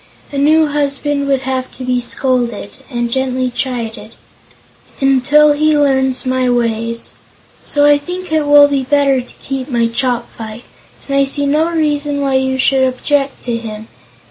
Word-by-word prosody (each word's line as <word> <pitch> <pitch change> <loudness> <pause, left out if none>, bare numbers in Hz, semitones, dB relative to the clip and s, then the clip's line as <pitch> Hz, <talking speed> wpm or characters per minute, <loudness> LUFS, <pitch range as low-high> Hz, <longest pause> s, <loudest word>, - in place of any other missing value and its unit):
A 285 - -5
new 310 +3 +4
husband 285 -1 -1
would 270 -2 +1
have 260 -1 -3
to 260 - -8
be 250 -1 0
scolded 240 -5 -2 0.2
and 240 -2 -2
gently 255 0 -1
chided 230 -4 -5 0.8
until 285 +3 +4
he 305 +1 +2
learns 265 -2 +1
my 255 -1 0
ways. 230 -1 -2 0.5
So 290 0 +2
I 290 0 +5
think 360 +4 -7
it 310 -2 +1
will 290 0 +7
be 280 -1 0
better 275 -1 +2
to 245 - -15
keep 270 -1 -4
my 235 -3 +1
Chopfyt, 235 -2 -3 0.4
and 275 - -2
I 275 - +4
see 285 +1 +1
no 305 +4 +1
reason 295 -3 -1
why 275 -1 0
you 265 0 +1
should 265 +1 +3
object 275 +2 -1
to 240 -2 -2
him. 220 -1 -8
265 Hz, 160 wpm, -15 LUFS, 245-290 Hz, 0.8 s, will